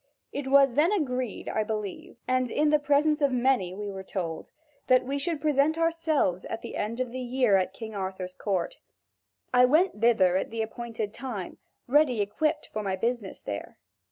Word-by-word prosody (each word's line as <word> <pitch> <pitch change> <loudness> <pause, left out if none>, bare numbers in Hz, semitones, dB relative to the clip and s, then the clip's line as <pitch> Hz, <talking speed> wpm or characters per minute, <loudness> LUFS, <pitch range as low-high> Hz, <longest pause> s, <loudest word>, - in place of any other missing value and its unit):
It 280 -1 -4
was 275 -1 +5
then 305 +8 +3
agreed, 255 - -2
I 215 - 0
believe, 210 -1 -5
and 255 -1 +1
in 300 +4 +2
the 300 - +4
presence 295 +1 +2
of 285 -1 +3
many 245 -8 +1
we 205 0 -5
were 190 -1 -6
told, 175 -4 -5 0.4
that 255 0 +4
we 280 +2 -2
should 325 +1 -2
present 300 +1 +2
ourselves 330 - +1
at 225 - -5
the - - -6
end 225 +3 -3
of 250 -2 -2
a 255 - -4
year 250 -4 +2
at 190 0 0 0.2
Arthur's 190 -2 -4
court. 185 -2 -2 0.7
I 250 0 +7
went 305 - +2
thither 190 -6 +4
at - - -2
the 225 0 -2
appointed 225 -2 -5
time, 235 -8 -6 0.3
ready 265 -3 +3
equipped 305 +10 -1
for 215 - -2
my 195 -2 -1
business 230 0 -3
there. 100 -1 -6
245 Hz, 180 wpm, -27 LUFS, 200-285 Hz, 0.7 s, I